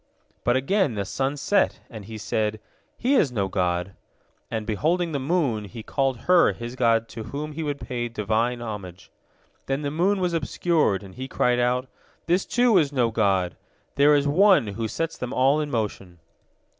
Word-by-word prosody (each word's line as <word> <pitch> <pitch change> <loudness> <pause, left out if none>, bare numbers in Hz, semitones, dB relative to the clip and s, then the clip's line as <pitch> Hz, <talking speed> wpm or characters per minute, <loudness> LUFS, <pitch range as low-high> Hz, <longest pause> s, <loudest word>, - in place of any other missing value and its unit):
But 120 - +2
again 140 - +1
the 100 -1 -2
sun 135 +8 -2
set, 200 +8 +1
and 110 -4 -10
he 110 +1 -8
said, 110 0 -1 0.4
"He 255 +4 +1
is 155 - +3
no 100 -5 -1
god," 90 0 -1 0.6
and 110 -2 -3
beholding 165 - 0
the 140 - -1
moon, 135 - 0
he 110 +2 -9
called 135 -2 -1
her 180 +5 +4
his 120 +1 -7
god 115 -2 +2
to 110 -2 -7
whom 145 +6 -5
he 155 +2 -5
would 145 -2 -3
pay 120 -2 -3
Divine 115 +2 -1
homage. 95 -5 -8 0.6
Then 135 +2 -1
the 140 - -2
moon 190 +6 +1
was 180 -2 0
obscured, 155 - +1
and 95 -1 -12
he 130 +1 -6
cried 125 -2 +1
out: 125 +1 +1 0.4
"This, 175 +3 +1
too, 240 -5 +4
is 145 -3 +1
no 125 -5 +1
god! 95 -5 +1 0.4
There 145 +1 +5
is 145 0 +2
One 185 - +5
who 115 +1 -3
sets 165 +8 -3
them 125 -1 -4
all 135 +4 +3
in 150 - -3
motion." 105 -7 -3
125 Hz, 180 wpm, -24 LUFS, 110-150 Hz, 0.6 s, There